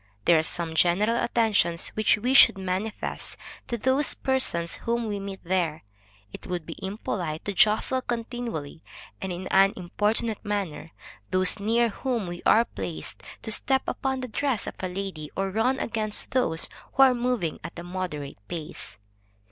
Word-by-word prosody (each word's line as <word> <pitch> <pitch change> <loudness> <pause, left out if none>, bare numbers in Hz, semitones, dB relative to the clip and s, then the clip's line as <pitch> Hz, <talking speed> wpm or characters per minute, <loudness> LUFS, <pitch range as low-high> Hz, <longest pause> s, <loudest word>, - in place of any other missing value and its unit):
There 165 -2 +6
are - - +3
some 165 0 0
general 180 +7 +3
attentions 210 -8 +1
which 215 -1 +2
we 245 +5 0
should 270 - +8
manifest 190 +3 -3 0.3
to 235 - -2
those 260 +5 +2
persons 170 -11 +1
whom 235 0 -1
we 205 -1 -2
meet 195 -1 -6
there. 170 - 0 0.5
It - - -9
would 175 -3 -3
be 165 - -7
impolite 185 -5 -3
to 205 - -2
jostle 220 +5 +3
continually, 230 - -4 0.4
and 190 - -3
in 180 +1 -5
an 195 +1 +5
importunate 210 +4 0
manner, 195 -7 -3 0.4
those 185 +3 +3
near 230 +3 +2
whom 235 0 -2
we 175 0 -6
are 230 +2 +6
placed, 90 - -6 0.2
to 220 - -3
step 265 +5 +3
upon 265 -1 -1
the 255 - -4
dress 255 -1 0
of - - -5
a 185 - -2
lady, 180 -5 -5
or 195 0 0
run 235 +6 +2
against 215 -2 -2
those 165 -11 +1 0.3
who 270 - +6
are 260 -1 +6
moving 240 -9 -1
at - - -8
a 170 - -6
moderate 175 - -5
pace. 160 -8 -7
200 Hz, 165 wpm, -26 LUFS, 175-235 Hz, 0.5 s, should